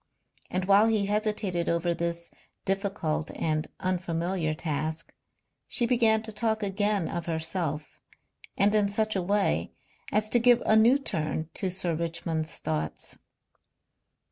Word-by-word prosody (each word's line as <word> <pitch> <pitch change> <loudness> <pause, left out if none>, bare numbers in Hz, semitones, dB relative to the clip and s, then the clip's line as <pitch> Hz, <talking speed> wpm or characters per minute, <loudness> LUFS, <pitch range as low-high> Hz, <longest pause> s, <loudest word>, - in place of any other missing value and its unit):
And 185 0 -1
while 200 +3 +6
he 215 -3 +2
hesitated 210 -4 -1
over 170 +1 +1
this 170 0 -3 0.3
difficult 195 -6 -1
and 155 -1 -1
unfamiliar 175 -2 -1
task 155 0 -3 0.5
she 240 - +2
began 230 -3 +3
to 220 - -5
talk 220 0 -1
again 200 -2 0
of 170 -1 -4
herself, 160 -2 -2 0.6
and 205 +1 +4
in 210 -1 +3
such 215 +1 0
a 190 - +1
way 200 +3 0 0.4
as 215 0 +2
to 240 - +4
give 245 0 +5
a 220 - +5
new 230 +5 +6
turn 160 - -2
to 190 - -1
Sir 180 -2 -1
Richmond's 165 -1 -2
thoughts. 80 -1 -3
185 Hz, 135 wpm, -28 LUFS, 165-210 Hz, 0.6 s, while